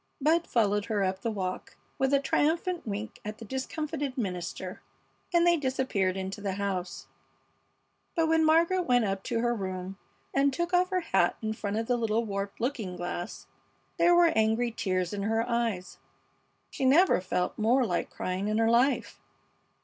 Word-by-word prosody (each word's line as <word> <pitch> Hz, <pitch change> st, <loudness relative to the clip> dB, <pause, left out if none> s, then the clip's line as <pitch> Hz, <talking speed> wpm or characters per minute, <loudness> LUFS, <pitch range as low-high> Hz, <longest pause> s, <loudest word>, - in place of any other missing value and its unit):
Bud 320 Hz, +4 st, +2 dB
followed 205 Hz, -3 st, +1 dB
her 210 Hz, -3 st, 0 dB
up 190 Hz, 0 st, -1 dB
the 230 Hz, -, -1 dB
walk 185 Hz, -4 st, -4 dB, 0.2 s
with 265 Hz, 0 st, +2 dB
a 280 Hz, -, +4 dB
triumphant 325 Hz, +4 st, 0 dB
wink 210 Hz, +2 st, -5 dB
at 210 Hz, +1 st, -6 dB
the 225 Hz, -, -9 dB
discomfited 280 Hz, +3 st, -4 dB
minister, 185 Hz, -3 st, -4 dB, 0.5 s
and 345 Hz, -1 st, +4 dB
they 345 Hz, -1 st, +5 dB
disappeared 260 Hz, -, 0 dB
into 190 Hz, +1 st, -5 dB
the 200 Hz, -2 st, -2 dB
house; 190 Hz, -2 st, -3 dB, 1.1 s
but 330 Hz, -2 st, +2 dB
when 320 Hz, 0 st, +3 dB
Margaret 335 Hz, +3 st, +3 dB
went 245 Hz, -2 st, +4 dB
up 195 Hz, -1 st, -2 dB
to 230 Hz, -2 st, -1 dB
her 240 Hz, 0 st, +1 dB
room 190 Hz, -2 st, -5 dB, 0.3 s
and 275 Hz, +1 st, +3 dB
took 345 Hz, +5 st, -2 dB
off 360 Hz, +1 st, +3 dB
her 370 Hz, -1 st, 0 dB
hat 190 Hz, -, +1 dB
in 220 Hz, 0 st, -1 dB
front 210 Hz, -1 st, -3 dB
of 225 Hz, -, -1 dB
the 245 Hz, +1 st, +1 dB
little 225 Hz, 0 st, 0 dB
warped 200 Hz, -1 st, -4 dB
looking 225 Hz, -7 st, -2 dB
glass 175 Hz, 0 st, -5 dB, 0.5 s
there 350 Hz, 0 st, +5 dB
were 345 Hz, -1 st, +5 dB
angry 220 Hz, +2 st, +2 dB
tears 185 Hz, -5 st, -1 dB
in 200 Hz, -, -3 dB
her 225 Hz, +3 st, 0 dB
eyes. 230 Hz, -6 st, -2 dB, 0.7 s
She -, -, -4 dB
never 290 Hz, -, +5 dB
felt 180 Hz, +1 st, -2 dB
more 240 Hz, +4 st, +3 dB
like 175 Hz, -5 st, -1 dB
crying 185 Hz, +2 st, -3 dB
in 215 Hz, 0 st, 0 dB
her 225 Hz, 0 st, +3 dB
life. 250 Hz, +4 st, +2 dB
225 Hz, 170 wpm, -29 LUFS, 195-280 Hz, 1.1 s, they